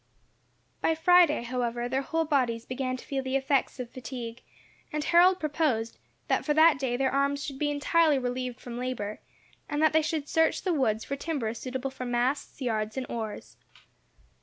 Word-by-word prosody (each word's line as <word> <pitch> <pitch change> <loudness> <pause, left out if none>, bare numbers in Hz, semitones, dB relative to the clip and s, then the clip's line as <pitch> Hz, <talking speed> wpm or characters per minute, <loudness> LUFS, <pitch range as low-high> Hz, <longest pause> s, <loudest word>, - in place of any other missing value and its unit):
By 325 - +2
Friday, 335 -4 +5
however, 240 -1 -2
their 265 +2 0
whole 325 +4 -1
bodies 245 -6 0
began 255 0 -3
to - - -12
feel 275 -1 -2
the 260 0 -3
effects 270 0 +1
of 245 -1 -5
fatigue; 240 -1 -7 0.5
and 300 0 -2
Harold 360 +3 +5
proposed, 290 -7 -1 0.3
that - - +1
for 295 - 0
that 315 -2 +6
day 250 -3 -1
their 265 0 +1
arms 280 +1 +1
should 270 -1 -6
be 295 - +1
entirely 295 +1 +3
relieved 250 -1 -3
from 240 -1 -7
labour, 230 -5 -4 0.5
and 295 -1 -1
that 315 - +4
they 315 - +5
should 310 -2 -2
search 320 +1 +2
the 365 - +1
woods 225 -7 +1
for 280 - -3
timber 275 -7 -2
suitable 260 +3 -4
for 255 -1 -6
masts, 245 +5 -1
yards, 220 -1 -2
and 260 - -2
oars. 220 -3 -6
265 Hz, 180 wpm, -28 LUFS, 245-300 Hz, 0.5 s, that